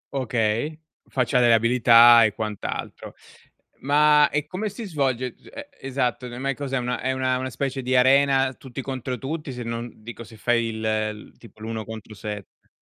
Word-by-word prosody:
Okay, 120 +4 -1 0.3
faccia 125 0 +1
delle 120 -1 +5
abilità 115 0 +7
e 105 - +2
quant'altro. 110 -2 -5 0.6
Ma, 150 +1 +4
e 150 0 -2
come 195 +7 -4
si 220 +3 -8
svolge? 130 - -1
G - - -19
ehm, 285 - -8 0.2
esatto, 130 -2 -2
no 120 0 -8
mai 135 0 -1
cos'è, 135 -1 -4
è - - +2
una 125 0 -3
è 130 +1 -1
una 130 -1 0
una 130 0 -3
specie 135 +2 -3
di 130 0 0
arena, 135 +1 +4
tutti 130 0 -9
contro 130 -1 -4
tutti, 150 +4 -5
se 125 -1 -6
non 115 +1 -5
dico 115 +1 -9
se 110 - -14
fai 115 +1 +1
il 110 -1 -5 0.5
il - - -29
tipo 115 -2 -17
l'1 110 -1 -5
contro 110 0 -9
7. 105 -1 -9
125 Hz, 185 wpm, -24 LUFS, 115-135 Hz, 0.6 s, abilità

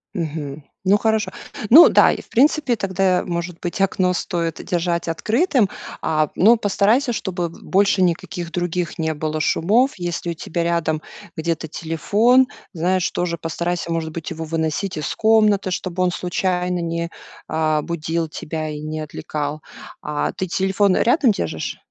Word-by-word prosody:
Мгм. 155 -4 -4 0.2
Ну, 200 +2 +4
хорошо. 220 0 0 0.4
Ну 315 +8 +10
да, - - +6
и - - -4
в - - -23
принципе 280 0 +3
тогда 190 -3 +1
может 170 0 -4
быть 175 +2 -4
окно 185 -1 +2
стоит 170 -2 -3
держать 170 -1 -1
открытым. 225 - +1 0.3
А, 155 -2 +1
но 225 +5 +6
постарайся 220 +5 +2
чтобы 180 -5 -3
больше 195 +3 +1
никаких 175 0 -1
других 175 0 -2
не 160 -1 -1
было 155 +1 -3
шумов. 215 - +2
Если 175 -1 -3
у - - -2
тебя 170 +1 -3
рядом 170 -2 0 0.4
где-то 160 0 -2
телефон, 205 - +2 0.3
знаешь, 180 +2 +1
тоже 170 -1 -2
постарайся, 170 +1 -3
может 160 -1 -2
быть, 165 +1 -6
его 160 0 -5
выносить 160 +3 -2
из 150 -3 -2
комнаты, 215 -3 +3
чтобы 185 0 -3
он 180 - +2
случайно 180 0 -1
не, 170 0 -2 0.4
а, 155 -1 +1
будил 165 0 -2
тебя 155 0 -5
и 150 0 -6
не 155 0 -4
отвлекал. 150 0 -4 0.4
А 150 0 -2
ты 185 - -3
телефон 190 +2 +2
рядом 250 0 +4
держишь 80 - -3
175 Hz, 150 wpm, -21 LUFS, 160-195 Hz, 0.4 s, Ну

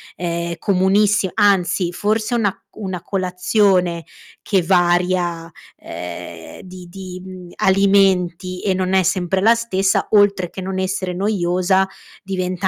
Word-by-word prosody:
è 170 -1 -3
comunissi 195 +2 +2
anzi 185 -3 +2
forse 215 +5 -1
è - - +2
una 205 -3 +1
c - - -32
una 190 -4 -5
colazione 185 -2 +1 0.4
che 195 -3 +1
varia, 175 -1 +1 0.3
ehm, 85 -1 -9
di 185 -1 -11
di, 185 0 -9
mhmm, 185 -1 -10
alimenti, 190 -2 +2
e 195 - +1
non 185 0 -1
è 190 - +4
sempre 185 +1 0
la 225 +4 +5
stessa, 195 -4 0
oltre 200 -4 +3
che - - -10
non 190 0 -4
essere 185 -1 -2
noiosa, 190 -1 +1 0.3
diventa 185 -1 -2
185 Hz, 135 wpm, -19 LUFS, 175-195 Hz, 0.4 s, la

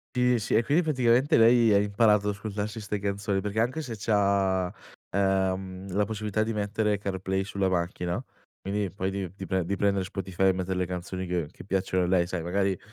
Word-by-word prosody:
Sì, 125 -1 +3
sì, 110 - -1
e 115 - +4
quindi 145 +8 +3
praticamente 135 -2 +3
lei 115 -1 +6
ha - - +6
imparato 105 0 +3
a - - +2
ascoltarsi 105 +2 -4
'ste 105 -1 -3
canzoni, 100 0 -1
perché 105 +2 -2
anche 125 +7 0
se 120 -7 -6
c'ha, 100 -3 +1 0.4
ehm, 95 -1 -1
la 105 +3 +1
possibilità 110 0 -2
di 110 +1 -1
mettere 105 0 0
CarPlay 95 -1 -2
sulla 100 -1 -1
macchina, 90 +3 -1 0.4
quindi 100 0 -2
poi 95 0 -2
di 95 -2 -3
di 95 - -7
pre 95 -2 0
di 100 - -1
prendere 100 -1 +1
Spotify 95 -1 -4
e - - +6
mettere 95 0 -2
le 90 - +1
canzoni 90 +1 -5
che 85 -3 -1
che - - -13
piacciono 95 -1 0
a - - -2
lei, 90 -1 +2
sai 90 -1 -3
magari 95 +2 0
100 Hz, 200 wpm, -27 LUFS, 95-105 Hz, 0.4 s, lei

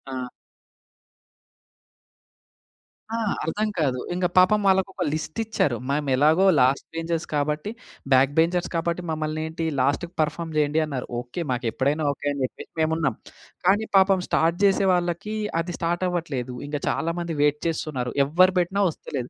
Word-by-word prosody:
ఆ! 125 -1 -4 2.8
ఆ! - - -2 0.3
అర్థం 205 +7 -1
కాదు 135 -5 +1
ఇంక 180 0 -1
పాపం 185 +4 +6
వాళ్ళకి 190 0 +3
ఒక 190 -2 -2
లిస్ట్ 155 +4 -4
ఇచ్చారు. 205 - 0
మేము 145 0 0
ఎలాగో 155 +7 +4
లాస్ట్ 130 +2 +3
బెంచర్స్ 165 0 -2
కాబట్టి, 150 +6 -1 0.4
బ్యాక్ 130 +1 +5
బెంచర్స్ 175 +2 +2
కాబట్టి 170 +1 -1
మమ్మల్ని 155 0 -2
ఏంటి 160 +1 -4 0.2
లాస్ట్‌కి 145 +6 0
పర్ఫార్మ్ 160 +1 -2
చేయండి 150 +1 +2
అన్నారు. 140 -4 -5
ఓకె, 120 +8 -6
మాకు 125 0 -2
ఎప్పుడైనా 145 +5 0
ఓకె 140 - -5
అని 140 - -5
చెప్పేసి - - -9
మేము 155 0 +2
ఉన్నాం. 145 -8 0 0.5
కానీ 205 +3 +4
పాపం 190 -1 +4
స్టార్ట్ 165 +2 +2
చేసే 195 0 +3
వాళ్ళకి 175 +4 -1 0.3
అది 175 +1 -5
స్టార్ట్ 175 +2 0
అవ్వట్లేదు. 140 -8 -3
ఇంగ 145 0 -3
చాలామంది 165 0 -2
వెయిట్ 150 0 +3
చేస్తున్నారు. 145 -6 -2
ఎవరు 180 +6 +4
పెట్టినా 190 +3 +1
వస్తలేదు. 135 -5 -6
160 Hz, 145 wpm, -24 LUFS, 145-175 Hz, 2.8 s, పాపం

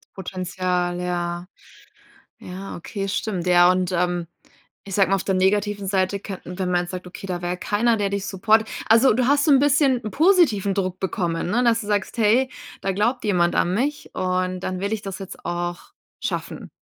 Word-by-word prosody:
Potenzial, 180 -1 -2
ja. 175 0 -3 0.9
Ja, 190 +2 -8
okay, 195 +3 -5
stimmt. 195 -2 -2
Ja, 175 0 +6
und, 185 -1 0
ähm, 175 -1 0 0.6
ich 195 - -7
sag 195 -2 +4
mal, 195 - +3
auf 195 - 0
der 190 -1 +1
negativen 200 +1 +1
Seite 190 0 0
könnten 185 -2 -8
wenn 185 -1 -1
man 175 -1 +2
jetzt 175 - -7
sagt, 185 -1 -6
okay, 185 +2 -9
da 175 -1 -3
wär 175 +1 -2
keiner, 225 +5 +1
der 200 -1 -1
dich 200 -1 -2
supportet 215 +3 +2 0.2
Also, 230 +3 +6
du 250 0 +1
hast 285 0 +3
so 300 - +4
'n 270 - +6
bisschen 275 -3 +3
positiven 275 - +3
Druck 185 -2 -2
bekommen, 175 -3 -2
ne, 240 +5 +2
dass 230 -1 +3
du 205 - -8
sagst: 205 +3 -1
„Hey, 235 +5 +3 0.3
da 195 - -1
glaubt 230 +6 0
jemand 175 -4 +2
an 180 +1 +1
mich 285 +6 -2
und 185 0 -1
dann 185 0 -4
will 200 +2 -2
ich 215 -1 -2
das 195 -1 -6
jetzt 195 - -9
auch 175 0 -4 0.3
schaffen.“ - - -4
190 Hz, 195 wpm, -23 LUFS, 180-215 Hz, 0.9 s, Ja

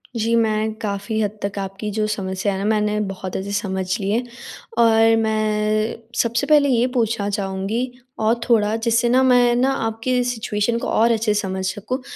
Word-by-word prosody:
जी, 230 0 0
मैं 220 -1 +1
काफ़ी 210 +1 -3
हद 210 0 -2
तक 200 0 -3
आपकी 195 +2 -5
जो 215 - +1
समस्या 195 -1 -2
है 190 - -3
ना 200 - -2
मैंने 210 -1 +1
बहुत 190 -1 -7
अच्छे 195 +1 -5
समझ 190 -2 -2
ली 195 -1 -2
है, 235 +4 +1 0.5
और 225 -1 +5
मैं 215 0 0 0.3
सबसे 235 +4 -1
पहले 295 -2 +5
ये 245 -1 +3
पूछना 225 -3 0
चाहूँगी 200 +4 -2 0.3
और 220 +2 +3
थोड़ा 215 -2 +3
जिससे 230 +1 +1
ना 255 +2 +4
मैं 245 -2 +4
ना 255 +2 +2
आपकी 230 +3 0
सिचुएशन 230 -2 -1
को - - -4
और 230 +2 +3
अच्छे 220 -1 +1
से 210 - +1
समझ 190 -2 -4
सकूँ। 205 +7 -3
220 Hz, 185 wpm, -21 LUFS, 205-235 Hz, 0.5 s, और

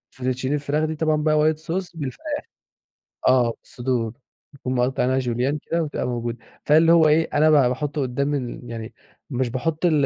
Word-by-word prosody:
fettuccine 130 0 -2
الفراخ 150 +1 0
دي 160 0 -3
طبعًا 155 0 +1
بقى 155 -1 +3 0.2
white - - -14
sauce 175 +3 -4
بالفراخ. 135 -5 -4 0.8
آه، 125 -3 +4
صدور 120 -3 -2 0.4
نكون 130 -1 -3
مقطّعينها 130 +1 +1
julienne 125 +4 0
كده 165 0 +1
وبتبقى 150 - -3
موجودة، 120 -1 -3 0.3
فاللي 160 +2 +5
هو 165 -2 +6
إيه، 160 +2 +3
أنا 155 +2 +4
ب - - +5
باحُطّه 140 +2 +2
قدّام 140 +3 -1
ال 125 -3 -4
يعني 115 0 -6 0.4
مش 125 -2 -1
باحط 155 +7 -2
ال 150 -5 +3
140 Hz, 165 wpm, -23 LUFS, 125-155 Hz, 0.8 s, هو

